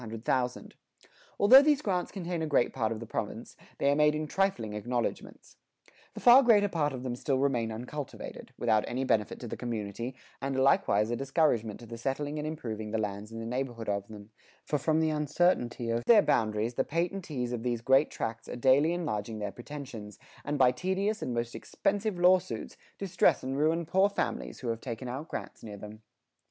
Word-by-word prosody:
Although 250 +7 +9
these 295 -1 +2
grants 180 -3 -1
contain 175 -3 -4
a 160 - -1
great 140 -5 +2
part 115 -4 -1
of 110 - -3
the 115 - -7
province, - - -5 0.2
they 140 - +2
are - - +2
made 150 0 +4
in 155 0 -2
trifling 150 - -1
acknowledgements. 120 +3 -4 0.6
The - - -6
far 250 +2 +8
greater 215 -5 +5
part 150 -5 0
of 130 -2 -6
them 125 -2 -3
still 135 +2 -1
remain 125 -5 0
uncultivated, 125 +5 -7
without 110 -3 +2
any 125 +2 -2
benefit 110 -5 0
to 120 - -6
the - - -5
community, 115 +1 -4 0.3
and 135 0 -2
are 130 - +1
likewise 135 - +3
a - - 0
discouragement 130 -5 0
to - - -10
the 115 0 -9
settling 145 +4 -2
and 150 - -3
improving 110 -9 -5
the 110 - -1
lands 105 0 -4
in 115 - -7
the 115 - -5
neighborhood 120 -1 -4
of 100 -1 -2
them, 105 0 -12 0.3
for 150 - 0
from 155 +3 +2
the 160 -1 +2
uncertainty 150 -6 +1
of 115 +1 -1
their 220 -4 +7
boundaries, 110 +1 +1
the - - +1
patentees 165 -7 -2
of 120 -2 -3
these 120 -1 -2
great 135 +5 +4
tracts 115 0 -5
are - - -5
daily 135 +6 +4
enlarging 110 -11 -3
their 105 -1 -4
pretensions, 120 -5 -9 0.3
and 145 +1 -2
by 130 -2 +5
tedious 190 - -1
and - - -3
most 120 0 -2
expensive 205 -1 -2
law 180 +1 +6
suits, 185 - -7 0.2
distress 185 -3 +2
and 130 +1 -3
ruin 160 +4 +1
poor 190 +5 +3
families 200 - -3
who 125 - -3
have 115 0 -3
taken 125 -1 -5
out 135 +6 -5
grants - - -7
near 105 -2 -8
them. 105 +2 -10
130 Hz, 195 wpm, -29 LUFS, 115-160 Hz, 0.6 s, Although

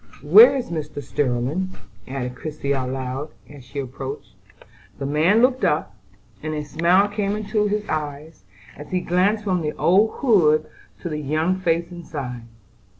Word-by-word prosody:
"Where 450 - +8
is 250 -6 -3
Mr. 155 -3 -4
Sterling?" 140 +8 -1 0.3
added 125 -1 -4
Christie 145 +1 -5
aloud, 130 +2 -3 0.2
as 145 -3 -13
she 135 +3 -11
approached. 135 +1 -6 0.6
The 140 - -4
man 160 - +3
looked 255 0 +2
up, 150 -9 0 0.5
and 155 0 -3
a 150 0 -4
smile 170 +6 +3
came 205 0 -2
into 210 0 0
his 210 0 -2
eyes, 150 0 -5 0.3
as 145 0 -11
he 185 - 0
glanced 185 +5 +1
from 185 -4 0
the 150 -1 -2
old 200 +6 +3
hood 155 - +4 0.4
to 175 - -4
the 150 -1 -3
young 155 +6 0
face 170 -1 0
inside. 135 -9 -7
155 Hz, 150 wpm, -22 LUFS, 140-190 Hz, 0.6 s, Where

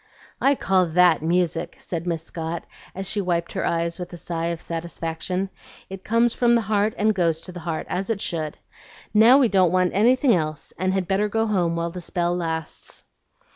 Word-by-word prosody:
"I 275 +1 +4
call 185 -6 +2
THAT 175 0 +4
music," 170 +1 0
said 170 0 -5
Miss 165 -2 -2
Scott, 165 0 -5 0.3
as 195 0 -3
she 205 +2 +1
wiped 170 -2 -1
her - - -2
eyes 170 +1 -1
with 180 - -6
a - - -6
sigh 170 -1 -3
of 170 -1 -2
satisfaction. 170 +3 -4 0.4
"It 190 -1 -7
comes 230 +1 +2
from 235 -1 +3
the 235 - +3
heart 210 0 0
and 215 +1 +3
goes 170 -4 +1
to 180 - -8
the 175 - -8
heart, 165 -2 -3
as 190 +4 -3
it 225 -3 0
should. 155 -5 -2 0.6
Now 225 +5 +7
we 270 -3 +5
don't 185 -5 +3
want 185 -1 +2
anything 245 +5 +4
else, 155 -4 -2
and 185 0 +1
had 190 -2 -1
better 200 +3 +1
go 225 +1 +1
home 180 -6 +1
while 170 0 -2
the 180 +1 -7
spell 175 0 -1
lasts." 160 -2 -4
180 Hz, 200 wpm, -23 LUFS, 170-205 Hz, 0.6 s, Now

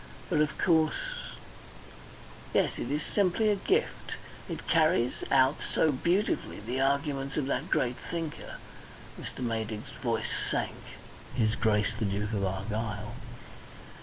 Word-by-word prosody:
But, 155 -3 +4
of 150 - +1
course 160 - +1 1.2
Yes, - - +2
it 120 - -3
is 150 +2 0
simply 205 +2 +2
a 205 - +4
gift! 395 - 0 0.4
It - - -5
carries 155 -7 +3
out 135 +2 +5
so 160 - +2
beautifully 175 - +1
the 120 +6 -2
arguments 140 0 +1
of 150 - +1
that 140 - -1
great 125 0 +2
thinker" 165 -3 -4 0.7
Mr. 130 - -6
Maydig's 110 -2 -3
voice - - 0
sank - - -1 0.6
"his 110 -3 +3
Grace 105 -2 +2
the 110 - +1
Duke 105 +2 -1
of 100 -2 0
Argyll. 105 +3 -2
130 Hz, 130 wpm, -30 LUFS, 110-155 Hz, 1.2 s, out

